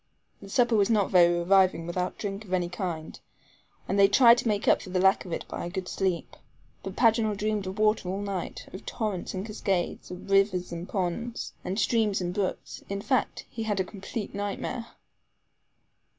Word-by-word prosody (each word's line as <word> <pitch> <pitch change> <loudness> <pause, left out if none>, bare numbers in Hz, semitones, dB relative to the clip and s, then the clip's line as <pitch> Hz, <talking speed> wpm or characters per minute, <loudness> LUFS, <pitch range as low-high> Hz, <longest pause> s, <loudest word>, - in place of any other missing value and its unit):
The 200 - -11
supper 240 +1 +3
was 205 0 +3
not 210 -4 +2
very 175 -2 +6
reviving 185 -1 +3
without 180 +1 -2
drink 200 0 -4
of 185 -3 -8
any 175 -1 +1
kind, 175 -4 -5 0.7
and 195 - 0
they 195 - +8
tried 235 +2 +7
to - - -2
make 205 -2 0
up - - +5
for - - -9
the 185 0 0
lack 190 +1 +4
of 180 - -8
it - - -3
by - - -5
a 175 - -4
good 185 0 -4
sleep. 185 -3 -2 0.5
But - - -7
Paganel 220 -3 +3
dreamed 210 -2 -1
of 190 +2 -5
water 215 -3 +2
all 190 +2 -2
night, 195 -3 -4
of 185 - -8
torrents 205 -5 -3
and 190 +2 -3
cascades, 195 -4 -2
and 180 0 -8
rivers 195 -2 +2
and 170 +1 -6
ponds, 205 +5 -3
and 190 +2 -3
streams 220 -2 +2
and 175 -1 -2
brooks 195 -1 -3
in 200 0 -3
fact, 260 - 0
he 230 - -7
had 210 -3 -1
a - - +3
complete 200 +3 -6
nightmare. 205 +3 -4
195 Hz, 195 wpm, -27 LUFS, 180-215 Hz, 0.7 s, they